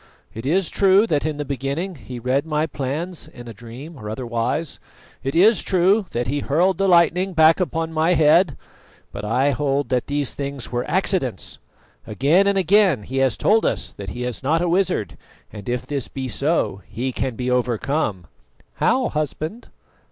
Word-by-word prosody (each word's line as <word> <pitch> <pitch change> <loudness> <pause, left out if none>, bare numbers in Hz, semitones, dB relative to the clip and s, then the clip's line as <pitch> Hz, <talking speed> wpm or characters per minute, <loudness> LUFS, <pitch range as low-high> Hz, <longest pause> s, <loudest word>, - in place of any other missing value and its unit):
It 115 +4 -6
is 180 +4 +1
true 195 +2 +4
that 155 -7 0
in 155 -2 -3
the 150 - -3
beginning 140 +7 -3
he 130 -4 -9
read 130 +4 0
my 155 -1 0
plans 155 +4 -4
in 120 0 -12
a 115 - -7
dream, 120 +9 -10
or 105 - -7
otherwise; 120 +6 -3 0.4
it 135 +3 -3
is 205 +6 +5
true 190 +2 +2
that 120 +1 -2
he 145 +3 -1
hurled 170 +7 +1
the 195 - +2
lightning 180 +1 +3
back 160 +1 +5
upon 165 -2 -2
my 160 +3 +2
head; 155 0 +4 0.5
but - - -7
I 130 +7 +2
hold 140 0 -1
that 125 -2 0
these 145 -2 -1
things 140 -4 -5
were 120 0 -2
accidents. 175 - -1 0.5
Again 150 - +3
and 200 0 +2
again 190 - +3
he 130 +6 -5
has 135 -4 +2
told 220 +2 +3
us - - -1
that 100 -2 -8
he 120 +6 -5
is 125 -2 -4
not 155 +5 +1
a 175 - 0
wizard; 180 - 0 0.3
and 105 +1 -8
if 125 0 -2
this 140 -2 -3
be 135 -1 -5
so, 140 - 0
he 130 +4 -3
can 130 -1 -3
be 125 +2 -2
overcome." 125 - -1 0.5
"How, 260 -1 +2
husband?" 155 - -4
145 Hz, 180 wpm, -22 LUFS, 125-175 Hz, 0.5 s, is